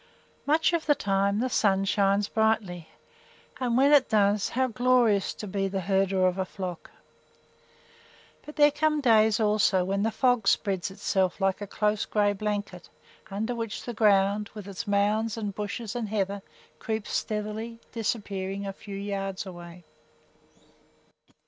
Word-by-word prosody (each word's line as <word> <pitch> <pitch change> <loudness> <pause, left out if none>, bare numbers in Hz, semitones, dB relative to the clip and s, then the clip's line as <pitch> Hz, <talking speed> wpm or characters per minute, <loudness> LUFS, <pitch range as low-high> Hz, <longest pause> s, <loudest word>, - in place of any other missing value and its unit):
Much 315 +3 +3
of 335 -1 -1
the 295 - +5
time 200 -1 0
the 255 - +1
sun 195 -5 +2
shines 200 0 +2
brightly, 215 -7 0 0.7
and 245 -2 0
when 275 +2 +5
it 285 -3 +5
does, 205 -1 +2
how 260 +1 +1
glorious 245 -4 +2
to - - -8
be 195 0 -2
the 195 0 -3
herder 190 0 +1
of 185 +1 0
a - - +2
flock! 185 -2 -7 1.5
But 300 - -11
there 295 0 +5
come 305 +1 +1
days 220 -4 +4
also 210 -3 +2
when 195 +1 -1
the 220 - +1
fog 245 -2 +1
spreads 195 -3 +1
itself 190 -1 -1
like 195 0 0
a 205 - -5
close 210 +1 0
gray 205 -1 +1
blanket, 205 -3 -4 0.4
under 215 +5 -2
which 230 -3 -5
the 240 - -5
ground, 205 -1 +2
with 205 -2 -8
its 200 +2 -6
mounds 210 +2 +1
and 205 -3 -3
bushes 210 +2 -5
and 230 -3 -3
heather, 200 -1 -2 0.4
creeps 220 -1 -4
stealthily, 215 +2 -3
disappearing 200 -3 -3
a 195 - -4
few 200 0 -9
yards 195 -1 -4
away. 175 -1 -10
205 Hz, 150 wpm, -27 LUFS, 195-225 Hz, 1.5 s, the